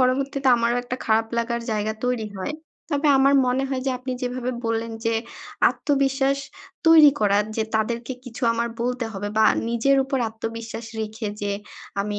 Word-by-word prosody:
পরবর্তীতে 270 +1 +1
আমারও 235 +1 +1
একটা 250 +1 -4
খারাপ 225 0 +2
লাগার 235 0 -1
জায়গা 215 0 0
তৈরি 245 -3 0
হয়। 190 +10 -3 0.4
তবে 290 +1 +2
আমার 275 +1 +5
মনে 255 +2 +1
হয় 265 -1 -2
যে - - +2
আপনি 255 0 -4
যেভাবে 250 0 -2
বললেন 230 0 -1
যে 230 0 +1 0.6
আত্মবিশ্বাস 275 -1 +1 0.5
তৈরি 315 -3 +9
করার। 205 0 +3
যে 220 - +2
তাদেরকে 235 +3 -1
কিছু 250 +1 -10
আমার 235 +1 -1
বলতে 250 0 -1
হবে 205 +1 -4
বা 220 - +6 0.2
নিজের 235 +4 +2
উপর 270 0 -1
আত্মবিশ্বাস 225 +1 -6
রেখে 220 +1 -4
যে 205 0 -1 0.5
আমি 205 +1 -2
235 Hz, 165 wpm, -23 LUFS, 225-265 Hz, 0.6 s, তৈরি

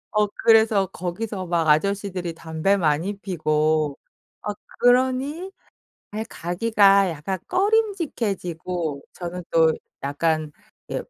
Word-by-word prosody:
어 210 -1 +3 0.2
그래서 220 -3 +5
거기서 185 +2 -5
막 170 -2 0
아저씨들이 185 +1 +1
담배 160 +4 0
많이 175 +3 0
피고 155 -5 0 0.4
어 210 - -2 0.3
그러니 260 +8 +2 0.6
아이 215 +1 -4
가기가 195 +2 +3
약간 170 +4 -4
꺼림직해지고 205 - -1
저는 180 0 -6
또 160 -1 +4 0.3
약간 155 +2 0 0.4
이렇게 - - -5
185 Hz, 240 characters per minute, -23 LUFS, 160-220 Hz, 0.6 s, 그래서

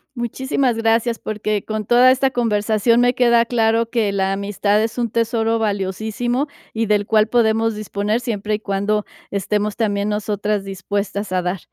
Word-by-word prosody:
Muchísimas 250 +1 -1
gracias, 230 +1 +1
porque 215 -1 -2
con 215 -1 -4
toda 245 +4 +6
esta 265 +1 +2
conversación, 225 -1 +1
me 245 0 +3
queda 235 -2 +4
claro 230 -1 +1
que 225 -4 0
la 195 -1 0
amistad 205 +1 0
es 225 +1 -3
un 240 -1 0
tesoro 230 0 0
valiosísimo 220 +6 -1 0.3
y, 225 0 -1
del 205 -1 +2
cual, 215 0 +3
podemos 225 -1 +2
disponer, 210 +1 -2
siempre 215 -4 -2
y - - -5
cuando 205 +1 -1 0.3
estemos 205 +1 -1
también 205 -2 0
nosotras 210 -1 -1
dispuestas 200 +1 -4
a 185 0 +1
dar. 180 +2 -2
215 Hz, 160 wpm, -20 LUFS, 205-230 Hz, 0.3 s, toda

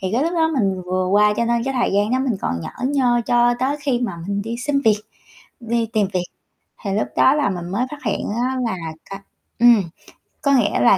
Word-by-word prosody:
Thì 190 - -2
cái 245 - +2
lúc 335 - -1
đó 320 -1 +2
mình 190 -4 0
vừa 185 +1 -1
qua 210 +2 +4
cho 235 - +1
nên 235 0 0
cái 270 0 -2
thời 245 -5 +1
gian 205 +2 +2
đó 255 - +2
mình 260 -5 0
còn 85 -1 -2
nhởn 255 - -4
nhơ, 245 -4 +2
cho 240 0 +3
tới 275 +3 0
khi 265 -4 0
mà 235 -8 -2
mình 200 0 -1
đi 230 +2 -4
xin 280 +2 0
việc, 215 -4 +3 0.6
đi 235 0 -1
tìm 210 -2 +2
việc 180 -1 0 0.6
thì 200 - -2
lúc 210 - 0
đó 265 - +5
là 295 -7 +1
mình 175 -2 -5
mới 230 +7 0
phát 295 -1 -9
hiện 210 - -1 0.2
á 260 +1 -1
là 205 -5 -2 0.3
cái 195 0 -6 0.4
ừm, 235 -4 +6 0.6
có 280 - +2
nghĩa 235 -6 +2
là 235 -5 +5
235 Hz, 235 wpm, -20 LUFS, 200-260 Hz, 0.6 s, ừm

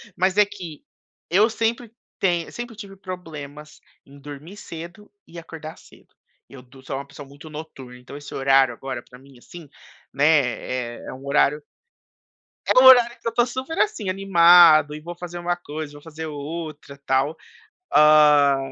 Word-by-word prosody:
mas 185 +2 0
é 210 - +6
que 180 -7 -10 0.5
eu 205 +6 +3
sempre 230 +1 -2 0.3
tenho 175 -3 -1
sempre 240 -1 -8
tive 200 -2 -11
problemas 155 -6 -10 0.3
em 140 +1 -17
dormir 145 +6 -11
cedo 170 +3 -11 0.2
e 170 - -10
acordar 160 -1 -10
cedo. - - -21 0.4
Eu 135 -2 -12
do 130 +1 -18
sou 135 - -4
uma 140 +1 -8
pessoa 140 0 -12
muito 145 +3 -14
noturna, 145 -5 -10
então 125 +3 -12
esse 145 -1 -11
horário 135 -2 +3
agora 130 +2 -7
pra 125 - -14
mim, 135 0 -19
assim, 170 +5 -13 0.5
né, 145 - +1 0.7
eh, - - -13
é - - -7
um 130 +1 -12
horário 150 +1 +1 1.0
é - - +4
um - - +5
horário 245 -2 +7
que 230 - -7
eu - - +3
estou 235 +1 +1
super, 260 +6 -6
assim, 220 - -1
animado 170 -5 +6
e 150 - -8
vou 170 +2 -9
fazer 175 0 -8
um 175 - -11 0.2
coisa, 150 0 -7
vou 145 - -13
fazer 160 +1 -8
outra 150 -1 -8
tal. 135 +4 0 0.6
Ah, 150 -2 +5
155 Hz, 170 wpm, -22 LUFS, 140-185 Hz, 1.0 s, horário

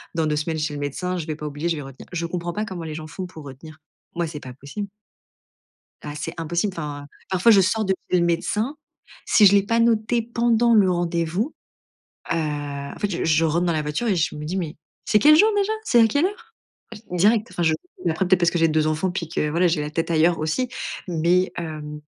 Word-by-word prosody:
dans 160 - +1
2 150 - 0
semaines 155 +2 -2
chez 150 0 -2
le 145 - -5
médecin, 180 +6 -3
je 165 -2 -5
vais 155 - -2
pas 150 - -8
oublier, 150 +3 -3
je 165 - +1
vais 150 - -5
retenir». 135 0 -11
Je 170 -1 -2
comprends 175 0 -4
pas 210 +1 -2
comment 180 -4 -6
les 155 -1 -5
gens 155 0 -6
font 185 +5 -6
pour 160 -4 -11
retenir. 155 +4 -11 0.4
Moi, 170 - 0
c'est 150 -1 -7
pas 130 -3 -9
possible. 145 +10 -7 1.1
Ah 145 -1 -6
c'est 150 +3 -4
impossible 170 +4 -1
enfin. 145 -3 -5 0.2
Parfois, 190 +5 +4
je 200 - +7
sors 215 +4 +1
de 190 - +1 0.2
chez 180 - +4
le 170 - +2
médecin. 210 - -1 0.5
Si 210 - +6
je 195 - +7
l'ai 200 - +5
pas 230 +3 +1
noté 230 +1 +2
pendant 235 0 +2
le 195 -4 +5
rendez-vous, 175 - -1 0.8
heu, - - +2
en 145 -3 -3
fait, 205 - 0
je 170 - -2
je 160 0 +3
rentre 170 +3 +1
dans 170 - +1
la 155 - 0
voiture 150 +11 -2
et 200 - +2
je 160 - 0
me 150 0 -6
dis: 180 +5 -3
«Mais 165 -5 -3 0.3
c'est 210 - +4
quel 300 +4 +7
jour 425 +8 +6
déjà? 405 +1 +1
C'est 240 - +4
à 225 - +6
quelle 285 +9 +2
heure?». 405 +2 -6 0.4
Ah - - -8
j 210 - -12 0.2
direct, 215 +4 +3
enfin, 175 - -2
je 160 -1 +3 0.4
après 175 +3 0
peut-être 185 0 +4
parce 175 -1 +3
que - - -1
j'ai 165 - +5
2 155 -1 +1
enfants, 155 +4 0
puis 175 -3 -4
que 150 -2 -1
voilà, 170 +4 +2
j'ai 165 -2 +1
la 150 - -3
tête 165 +2 -2
ailleurs 165 +1 +3
aussi. 160 +12 -1 0.4
Mais, 175 +2 +2
hem, 150 -3 -6
170 Hz, 240 wpm, -23 LUFS, 155-205 Hz, 1.1 s, je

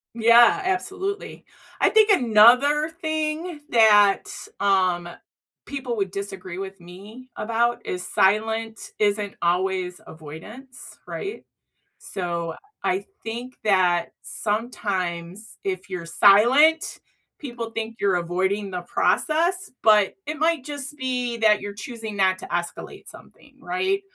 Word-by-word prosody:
Yeah, 235 - +6
absolutely. 385 +2 -3 0.4
I - - +5
think 435 -1 +5
another 250 - +5
thing 315 0 -3
that, 210 -4 +5 0.4
um, 185 -3 +1 0.6
people 265 -4 -4
would 195 -4 -2
disagree 190 -3 -6
with 195 0 -7
me 205 +9 -13
about 235 +2 -1
is, 180 -1 -4
silent 220 +3 0
isn't 205 -1 0
always 180 +1 0
avoidance, 170 - -11
right? 405 +2 -6 0.5
So, 170 -3 -4 0.3
I 375 +1 -1 0.2
think 240 +3 -6
that 180 -4 +2
sometimes 200 -4 -4
if 190 0 -4
you're 175 -2 -5
silent, 260 - +4 0.4
people 240 -5 -6
think 225 0 -5
you're 200 -2 +2
avoiding 190 +4 -1
the 180 -1 -5
process, 340 - 0
but, 210 -3 +4
it 305 +1 -4
might 320 -3 +1
just 290 0 -6
be 250 -3 -2
that 215 -2 +4
you're 205 0 -7
choosing 220 -1 -7
not 190 -1 +2
to - - -8
escalate 175 0 -5
something, - - -16
right? 375 +2 -1
220 Hz, 115 wpm, -23 LUFS, 190-275 Hz, 0.6 s, Yeah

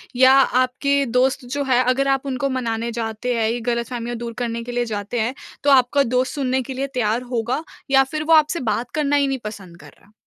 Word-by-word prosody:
या 260 +1 +6
आपके 270 +1 +2
दोस्त 250 +2 +1
जो 280 +4 -3
है 255 -2 +2
अगर 255 +2 +1
आप 270 0 +1
उनको 275 +1 -2
मनाने 235 -2 -2
जाते 225 +1 -3
हैं, 225 -1 +1
ये 240 - -2
ग़लतफ़हमियाँ 235 0 -3
दूर 235 0 -6
करने 230 0 -3
के 245 - -7
लिए 245 0 -1
जाते 210 +1 -4
हैं, 230 +3 0 0.3
तो 285 - +3
आपका 270 +1 +4
दोस्त 255 +1 0
सुनने 260 -2 0
के 265 +2 -6
लिए 270 +2 -3
तैयार 230 -1 0
होगा? 245 +5 -1 0.3
या 270 0 +6
फिर 305 +3 -4
वो 325 - +3
आपसे 315 +2 +4
बात 240 +1 -4
करना 290 -2 +1
ही 285 -1 +3
नहीं 270 -1 -2
पसंद 195 -5 -8
कर - - -14
रहा? 210 - -25
250 Hz, 220 wpm, -21 LUFS, 235-270 Hz, 0.3 s, या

